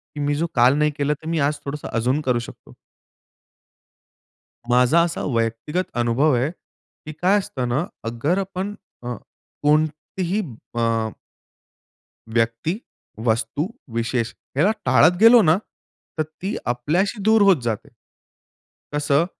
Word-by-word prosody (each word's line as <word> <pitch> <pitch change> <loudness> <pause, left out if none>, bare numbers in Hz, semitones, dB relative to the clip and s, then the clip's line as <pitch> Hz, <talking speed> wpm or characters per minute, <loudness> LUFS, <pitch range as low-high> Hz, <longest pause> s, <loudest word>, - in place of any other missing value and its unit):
की - - -6
मी 145 0 0
जो 165 +3 0
काल 125 +2 +5
नाही 150 0 +2
केला 145 0 +1
तर 155 +2 -11
मी 165 -1 0
आज 145 +1 +2
थोडंसं 145 +1 -5
अजून 125 +6 +1
करू 125 -4 +1
शकतो. 120 - -11 2.0
माझा 125 +7 +5
असा 170 -1 -2
व्यक्तिगत 115 +10 -1
अनुभव 120 +6 +3
आहे 125 +4 +1
की 155 -3 -16
काय 190 +3 +4
असतं 130 -10 -4
ना 135 +8 0 0.2
अगर 120 +11 0
आपण 195 +1 -3 0.3
अ, 120 0 -3 0.5
कोणतीही 155 +6 0 0.4
अ 115 -1 +1 1.2
व्यक्ती, 115 +8 0 0.5
वस्तू, 115 +5 0 0.3
विशेष, 115 0 -1 0.2
याला 180 +9 +4
टाळत 145 +7 +5
गेलो 230 +1 +9
ना, 160 -2 +4 0.6
तर 155 - +2
ती 180 +7 -6
आपल्याशी 170 - 0
दूर 220 +1 +5
होत 195 -3 +6
जाते. 115 -3 -3 1.0
कसं 145 +1 +2
145 Hz, 125 wpm, -22 LUFS, 120-170 Hz, 2.0 s, गेलो